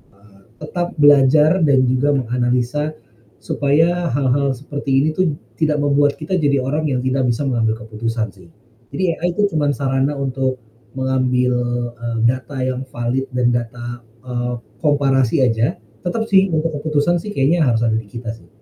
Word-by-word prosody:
eee, 100 0 -22 0.2
tetap 175 +3 -4
belajar 145 +4 +5
dan 140 -3 +4
juga 130 +3 +2
menganalisa, 125 +4 0 0.5
supaya 165 +4 +1
hal-hal 140 +1 +1
seperti 140 +2 -5
ini 155 +3 +2
tuh 185 -3 +2 0.2
tidak 150 -2 +1
membuat 145 0 +2
kita 170 +5 -2
jadi 145 -5 +2
orang 150 +4 -1
yang 125 - 0
tidak 130 +1 0
bisa 120 +4 0
mengambil 115 -3 0
keputusan 115 +1 -2
sih. 90 -3 -18 0.4
Jadi 180 -3 0
AI 175 +1 -1
tuh 205 -1 +2
cuman 145 -1 +2
sarana 135 +1 0
untuk 130 -1 -1 0.4
mengambil, 130 -1 +1 0.4
eee, 115 -1 -3
data 130 +2 -2
yang 130 0 -2
valid 125 +3 -2
dan 125 -1 +1
data, 120 0 -4 0.2
eee, 125 0 -2 0.3
komparasi 135 -2 +2
aja, 115 +1 0 0.3
tetep 200 +6 -1
sih 195 0 +5
untuk 160 0 0
keputusan 155 +3 +1
sih 210 - -7
kayaknya 155 +5 +3
harus 115 -1 +2
ada 115 -1 +2
di 110 -1 -3
kita 115 +1 -6
sih. 110 - -20
135 Hz, 160 wpm, -19 LUFS, 120-150 Hz, 0.5 s, belajar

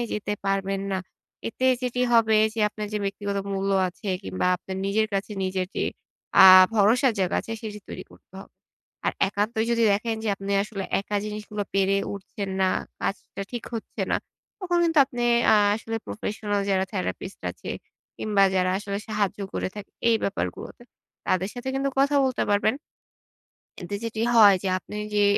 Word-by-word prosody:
যেতে 210 0 -2
পারবেন 195 0 0
না। 190 - 0 0.5
এতে 255 +3 -1 0.2
যেটি 250 0 -1
হবে 220 -2 +5 0.2
যে, 225 - -2
আপনার 210 0 -6
যে 210 - 0
ব্যক্তিগত 200 0 -3
মূল্য 195 0 -1 0.2
আছে 185 +3 -8
কিংবা 185 -1 -2
আপনার 190 +1 -7
নিজের 215 +2 +2
কাছে 195 +2 -2
নিজের 185 0 -1
যে - - +1 0.5
অ্যা 190 - +10 0.3
ভরসার 230 +5 +4
জায়গা 185 -2 +1
আছে 225 - -7
সেটি 210 -1 -6
তৈরি - - -7
করতে - - -21
হবে। - - -15 0.5
আর - - +2 0.2
একান্তই 215 +3 -1
যদি 230 0 +2
দেখেন 225 +3 0
যে - - 0
আপনি 195 +1 -4
আসলে 205 -2 -5 0.2
একা 205 +1 -3
জিনিসগুলো 210 0 -4
পেরে 195 0 +3 0.2
উঠছেন 200 0 -6
না, 190 - +4 0.3
কাজটা 195 0 -4
ঠিক 240 - -4
হচ্ছে 225 - -4
না। - - +4 0.4
তখন 350 -2 0
কিন্তু 325 -2 +2
আপনি 240 -3 -5 0.2
অ্যা 215 - +6 0.2
আসলে 225 0 -4
প্রফেশনাল 205 -1 -3
যারা 190 0 +2
therapist 190 0 -4
আছে - - -8 0.5
কিংবা 205 -2 +2
যারা 185 0 +2
আসলে 200 -1 -4
সাহায্য 210 -3 -1 0.2
করে - - -1
থাকে 205 -1 -8 0.2
এই 230 - +5
ব্যাপারগুলোতে 200 +4 -4 0.5
তাদের 185 +1 +1
সাথে 245 +1 -6
কিন্তু 275 +1 0
কথা 280 +1 +3
বলতে 255 -2 -1
পারবেন। 205 +3 +3 1.1
এতে 200 +3 -4
যেটি 225 -1 -3
হয় 205 -3 +8
যে, 195 - -1
আপনি 195 - -13
ওই 210 - -6
যে 205 - +4
205 Hz, 170 wpm, -25 LUFS, 195-225 Hz, 1.1 s, অ্যা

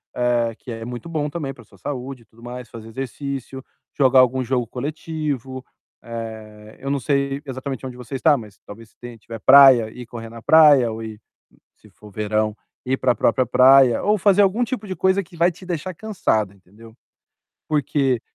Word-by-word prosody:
eh, 120 -2 +1
que 125 - -10
é 115 -1 -6
muito 120 +6 -7
bom 150 -2 -2
também 145 -4 -5
pra 115 - -16
sua 100 - -22
saúde 130 +3 -6
e - - -30
tudo 115 +1 -21
mais, 125 0 -8
fazer 115 -1 -11
exercício, 135 +1 -6 0.3
jogar 130 -2 +5
algum 130 +1 +3
jogo 125 -2 -1
coletivo. 140 -2 -5 0.4
Eh, 110 -2 -9
eu 135 - -4
não 140 - 0
sei 140 +1 -1
exatamente 130 0 -6
onde 125 -1 -7
você 125 +2 -8
está, 150 +2 +4
mas 105 -4 -12
talvez 110 +2 -12
se - - -34
tem 120 -1 -10
se 115 - -16
tiver 115 +1 -9
praia, 130 -3 +7
ir 125 - -10
correr 115 -1 -8
na 115 0 -11
praia 145 -7 +6
ou 110 +1 -6
ir, 110 -1 -9 0.6
se - - -21
for 105 -1 -16
verão, 110 +1 -1 0.3
ir 130 +1 +1
pra 125 -2 +2
própria 130 +2 +1
praia 130 0 +5
ou 210 +1 +3
fazer 200 +1 +4
algum 200 +5 +2
tipo 235 -3 -5
de 190 - -4
coisa 190 +3 +2
que 175 0 -16
vai 170 +2 +3
te 180 +2 -14
deixar 180 +1 -4
cansada, 110 - -1
entendeu? 105 +4 -18 0.7
Porque 135 -4 0
130 Hz, 195 wpm, -21 LUFS, 115-145 Hz, 0.7 s, praia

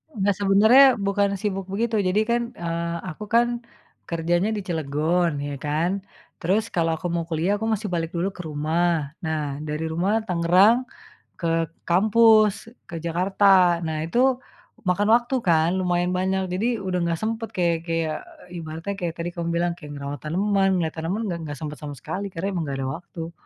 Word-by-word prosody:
Nah 200 -1 +2
sebenarnya 215 +7 +6
bukan 200 0 0
sibuk 195 -1 -3
begitu 220 +3 0
jadi 195 +1 +2
kan, 235 +2 +1
eee, 170 0 -3
aku 185 - -7
kan 235 +2 +4 0.6
kerjanya 175 +4 0
di 205 - -4
Cilegon 160 0 0
ya 145 -1 -5
kan, 160 +7 -1 0.4
terus 210 +6 0
kalau 165 -2 +1
aku 175 - -4
mau 170 -1 -2
kuliah, 170 +5 0
aku 220 - -2
masih 215 -3 -1
balik 165 -1 -2
dulu 180 +4 0
ke 190 - -18
rumah, 155 0 0
nah 150 -3 -3
dari 150 +1 -3
rumah, 195 +7 +1
Tangerang 190 +6 +4 0.5
ke 170 - -1 0.4
kampus, 215 +3 +4 0.2
ke 170 -3 -7
Jakarta. 180 +1 +3
Nah 160 -2 -3
itu 170 +9 -1 0.7
makan 180 +3 +2
waktu 240 +2 0
kan, 160 -1 +4
lumayan 180 -1 +1
banyak 190 +1 0
jadi 190 +6 0 0.2
udah 185 -1 -1
nggak 170 -1 -1
sempet, 225 +1 -2
kayak 170 -2 +2
kayak 165 -2 -1 0.3
ibaratnya 165 +2 -5
kayak 175 -3 -2
tadi 170 +1 -3
kamu 170 -1 -3
bilang, 175 +1 +1
kayak 150 -3 -10
ngerawat 140 0 -5
tanaman, 195 +5 +1
ngeliat 165 -3 -1
tanaman 175 +7 -2
nggak 170 -3 -3
nggak 145 -1 -6
sempet 150 -1 -6
sama 145 -1 -7
sekali 195 +9 -5
karena 185 +3 -3
emang 175 -3 -2
nggak 140 -1 -3
ada - - -2
waktu. 170 -1 -8
175 Hz, 170 wpm, -24 LUFS, 165-200 Hz, 0.7 s, sebenarnya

